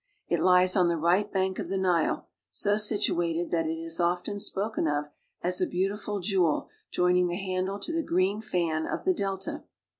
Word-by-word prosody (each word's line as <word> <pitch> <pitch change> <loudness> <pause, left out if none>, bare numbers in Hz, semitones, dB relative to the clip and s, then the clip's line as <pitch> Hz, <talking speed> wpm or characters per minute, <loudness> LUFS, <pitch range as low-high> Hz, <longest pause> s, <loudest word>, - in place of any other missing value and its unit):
It - - +1
lies 180 0 +5
on 180 -3 +4
the 170 -1 +1
right 180 +6 +2
bank 190 -1 0
of - - -4
the 195 - -1
Nile, 180 -4 +1 0.2
so 205 0 +1
situated 175 -6 +1
that 165 -2 +1
it 160 - -1
is 165 +1 -2
often 180 +3 0
spoken 205 -3 -1
of 150 0 -1 0.3
as 180 +1 0
a 185 - +2
beautiful 200 +3 -2
jewel 180 -5 +1 0.2
joining 180 0 +2
the 175 - -2
handle 190 0 -2
to 330 +11 -4
the 330 - +1
green 190 - 0
fan 170 -7 -1
of - - -4
the 370 - +4
delta. 195 - -3
185 Hz, 185 wpm, -28 LUFS, 170-200 Hz, 0.3 s, lies